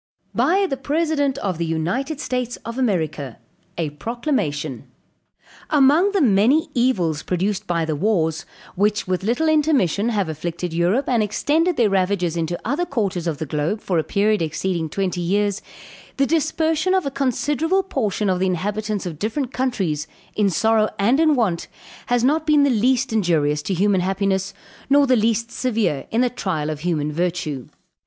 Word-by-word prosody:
BY 390 +4 +3
THE 270 -8 -2
PRESIDENT 285 0 0
OF 190 - -3
THE 170 - 0
UNITED 195 - -2
STATES 250 -3 -2
OF 230 +2 -5
AMERICA. 155 - -1 0.4
A 160 -3 -2
PROCLAMATION. 155 - -3 0.8
"Among 305 +7 +4
the 395 - +2
many 255 - +3
evils 185 - +1
produced 195 +3 -2
by 170 -2 0
the 155 -1 -2
wars, 165 -2 0 0.3
which, 210 +2 0
with 185 0 -1
little 240 +10 0
intermission, 280 - +2
have 205 -6 0
afflicted 165 +2 -4
Europe, 180 +11 +1
and 240 -3 +2
extended 305 - +1
their 225 -5 +3
ravages 185 -3 +1
into 170 +1 -2
other 285 +9 0
quarters 200 - -2
of 160 -3 -1
the 160 - -4
globe, 150 +8 -1
for 180 -5 0
a - - 0
period 210 +2 +1
exceeding 165 +1 -2
twenty 185 0 -2
years, 200 +3 0 0.6
the 275 - +3
dispersion 320 +3 +1
of 375 - +1
a 275 - -2
considerable 295 +7 0
portion 220 - -1
of 185 -1 +1
the 190 - +1
inhabitants 205 +3 -2
of 160 -4 -6
different 245 - -2
countries, 190 - -1 0.3
in 210 -2 +2
sorrow 220 +3 +2
and 230 +7 +3
in 315 -2 +4
want, 195 -9 0 0.4
has 245 -1 +1
not 305 +4 +2
been 300 -2 +5
the 280 - +3
least 250 +2 +1
injurious 155 -8 +1
to 190 +5 -2
human 195 +1 +2
happiness, 195 +1 0 0.4
nor 285 +1 +5
the 260 -1 +3
least 230 +1 +1
severe 225 - -1
in 230 - +1
the 250 - +3
trial 160 -10 -2
of 150 - -5
human 150 -3 -1
virtue. 165 -5 -2
210 Hz, 165 wpm, -21 LUFS, 175-265 Hz, 0.8 s, been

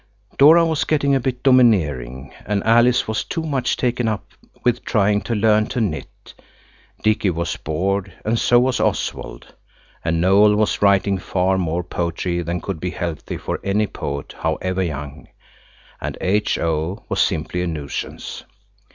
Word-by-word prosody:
Dora 160 +4 +7
was 160 -2 0
getting 140 -2 +1
a 135 - +3
bit 125 0 -3
domineering, 75 - +2
and 100 -1 0
Alice 120 +2 +4
was 110 0 -1
too 165 - -4
much 135 -6 -1
taken 125 -1 0
up 110 -2 -3 0.3
with 120 0 +1
trying 105 -2 +2
to 115 - -3
learn 110 0 +3
to - - -3
knit. 95 -9 -4 0.7
Dicky 105 -2 +2
was 85 -1 -2
bored 95 +5 -2
and 115 +2 +1
so 120 - +4
was 125 0 +1
Oswald, - - -3 0.5
and 80 0 0
Noël 100 +4 +5
was 105 0 0
writing 100 -1 +3
far 95 +1 0
more 85 0 -1
poetry 85 +1 -2
than 85 +1 -3
could 95 -5 -4
be 90 - -3
healthy 85 -4 -4
for - - -4
any 100 +2 +1
poet, 70 -7 -6
however 95 0 -1
young, 75 -5 -5 0.7
and - - -4
H.O. 90 -2 -1
was - - 0
simply 85 +3 -1
a 90 - -1
nuisance. 75 -4 -5
100 Hz, 150 wpm, -21 LUFS, 85-115 Hz, 0.7 s, Dora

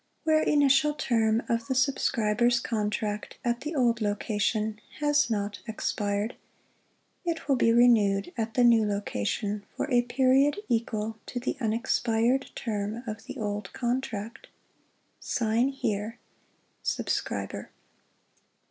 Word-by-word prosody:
Where 315 -1 +3
initial 290 0 +3
term 225 -5 +1
of 230 0 -1
the 260 - -1
subscriber's 240 -3 +2
contract 210 -2 -2
at 235 0 0
the 305 +3 -4
old 240 -4 +2
location 210 +1 -1 0.2
has 295 -1 +3
not 205 -2 -2
expired, 205 0 -2 0.9
it 335 -3 -3
will 275 - +4
be 230 -2 +3
renewed 220 -5 +4
at 225 -2 -3
the 245 - +4
new 230 -2 +6
location 205 - -2
for - - -1
a 245 -1 +5
period 265 +6 +3
equal 225 -2 -1
to 245 - -4
the 245 - -2
unexpired 235 +2 +1
term 215 0 -3
of 220 -1 -6
the 265 +1 -7
old 205 -3 -3
contract. 240 -3 -3 0.7
(Sign 230 +2 +1
here). 220 -4 -2 0.6
Subscriber. - - -2
230 Hz, 120 wpm, -28 LUFS, 210-255 Hz, 0.9 s, new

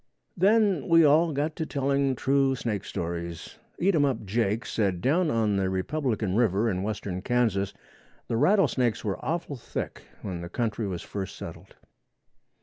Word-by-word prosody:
Then 200 -2 +3
we 165 -1 +6
all 160 +3 +5
got 150 +2 -1
to 160 - -2
telling 140 -1 +1
true 135 +1 +2
snake 110 -5 -3
stories. 85 -1 -5 0.2
Eatumup 145 - +2
Jake 110 +2 0
said 100 -5 0
down 155 - +2
on 110 -5 +1
the 95 -1 +1
Republican 110 0 -1
River 110 -1 +2
in 90 -1 -2
western 100 -3 -3
Kansas 105 -5 +1 0.6
the - - -1
rattle 180 - +4
snakes 120 -4 -1
were 95 -4 -3
awful 165 -4 -2
thick - - -5 0.2
when 90 -4 -4
the 85 - -6
country 110 0 -2
was 90 -3 -4
first 95 -2 -5
settled. - - -10
120 Hz, 150 wpm, -27 LUFS, 100-145 Hz, 0.6 s, we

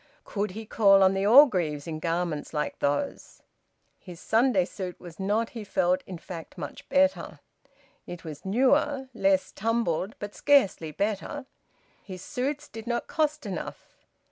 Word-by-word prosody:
Could 205 0 -2
he 220 - -6
call 195 -2 +5
on 190 0 +5
the 195 +1 0
Orgreaves 185 - +5
in 155 -2 -5
garments 165 -2 -2
like 150 - -2
those? 145 - -2 0.6
His 175 -3 -11
Sunday 225 -4 +2
suit 185 -1 -7
was 175 -1 -12
not, 210 +4 0
he 230 -3 -7
felt, 185 -2 +1
in 185 - -6
fact 165 -1 -9
much - - -8
better. 280 0 +1 0.7
It 175 -1 -8
was 155 -2 -8
newer, 265 +5 +2
less 195 -1 +2
tumbled, 220 -3 -1
but 205 0 -7
scarcely 265 - +3
better. 200 - -3 0.6
His 185 -2 -9
suits 285 +4 -3
did 225 +1 -10
not 235 0 -1
cost 305 -3 -1
enough. 190 -5 -8
195 Hz, 145 wpm, -27 LUFS, 175-240 Hz, 0.7 s, call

